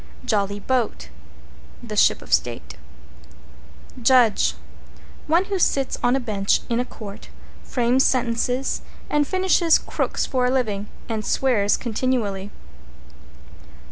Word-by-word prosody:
=JOLLY 205 Hz, -1 st, 0 dB
BOAT= 235 Hz, -, -1 dB, 0.7 s
The 215 Hz, -3 st, -6 dB
Ship 200 Hz, -, +3 dB
of 75 Hz, 0 st, -4 dB
State. 75 Hz, -3 st, -1 dB, 1.3 s
=JUDGE= 240 Hz, -3 st, +4 dB, 0.7 s
One 335 Hz, +5 st, +3 dB
who 390 Hz, -1 st, -2 dB
sits 275 Hz, -5 st, +1 dB
on 245 Hz, +1 st, +3 dB
a -, -, +1 dB
bench 205 Hz, -5 st, 0 dB
in 235 Hz, -, +1 dB
a 250 Hz, -, 0 dB
court, 210 Hz, -3 st, -10 dB, 0.3 s
frames 250 Hz, +1 st, +2 dB
sentences 250 Hz, +1 st, 0 dB, 0.3 s
and 295 Hz, -1 st, +2 dB
finishes 370 Hz, -3 st, +3 dB
crooks -, -, -2 dB
for 255 Hz, -1 st, 0 dB
a -, -, +1 dB
living, 210 Hz, -6 st, -1 dB, 0.2 s
and 220 Hz, -2 st, -3 dB
swears 215 Hz, -7 st, +2 dB
continually. 220 Hz, -5 st, -2 dB
240 Hz, 115 wpm, -22 LUFS, 205-260 Hz, 1.3 s, =JUDGE=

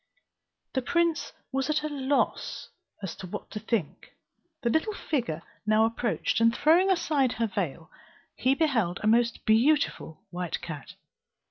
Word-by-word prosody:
The 260 Hz, -, +1 dB
prince 335 Hz, +4 st, +1 dB, 0.2 s
was 270 Hz, 0 st, -1 dB
at 305 Hz, 0 st, +1 dB
a -, -, 0 dB
loss 280 Hz, -1 st, -1 dB, 0.6 s
what -, -, -7 dB
to 215 Hz, -, -4 dB
think. 210 Hz, -7 st, -3 dB, 0.5 s
The 235 Hz, -, +2 dB
little 410 Hz, -, +1 dB
figure 230 Hz, -, -2 dB, 0.2 s
now 215 Hz, +1 st, +5 dB
approached, 230 Hz, 0 st, 0 dB
and 230 Hz, 0 st, +6 dB
throwing 345 Hz, +5 st, +4 dB
aside 300 Hz, -8 st, +2 dB
her 230 Hz, -, 0 dB
veil, 180 Hz, -5 st, -3 dB, 0.4 s
he 260 Hz, +2 st, +2 dB
beheld 235 Hz, -, +1 dB
a -, -, +1 dB
most 230 Hz, +1 st, +2 dB
beautiful 230 Hz, -, +2 dB
white 180 Hz, -1 st, -3 dB
cat. 160 Hz, -5 st, -8 dB
240 Hz, 135 wpm, -28 LUFS, 215-300 Hz, 0.6 s, and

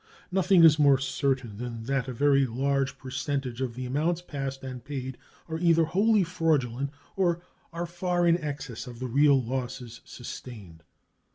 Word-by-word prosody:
Nothing 185 Hz, -1 st, +4 dB
is 155 Hz, -2 st, +7 dB
more 140 Hz, -2 st, +6 dB
certain 130 Hz, -4 st, -1 dB
than 115 Hz, -1 st, -5 dB
that 135 Hz, +2 st, -1 dB
a -, -, -3 dB
very 140 Hz, +1 st, +3 dB
large 135 Hz, +3 st, 0 dB
percentage 130 Hz, -1 st, -3 dB
of 125 Hz, -3 st, -2 dB
the 130 Hz, 0 st, -5 dB
amounts 155 Hz, +7 st, 0 dB
passed 135 Hz, -4 st, -5 dB
and 130 Hz, -2 st, -7 dB
paid 130 Hz, -2 st, -5 dB, 0.3 s
are 160 Hz, -1 st, -4 dB
either 165 Hz, -1 st, +4 dB
wholly 205 Hz, +5 st, +3 dB
fraudulent 140 Hz, -7 st, 0 dB, 0.3 s
or 175 Hz, -3 st, +1 dB, 0.3 s
are 170 Hz, +1 st, -3 dB
far 175 Hz, 0 st, 0 dB
in 170 Hz, 0 st, +4 dB
excess 140 Hz, -6 st, -5 dB
of 120 Hz, -1 st, -9 dB
the 130 Hz, -, -5 dB
real 140 Hz, +2 st, +4 dB
losses 125 Hz, -1 st, -5 dB
sustained. 105 Hz, -9 st, -9 dB
135 Hz, 160 wpm, -27 LUFS, 125-165 Hz, 0.3 s, is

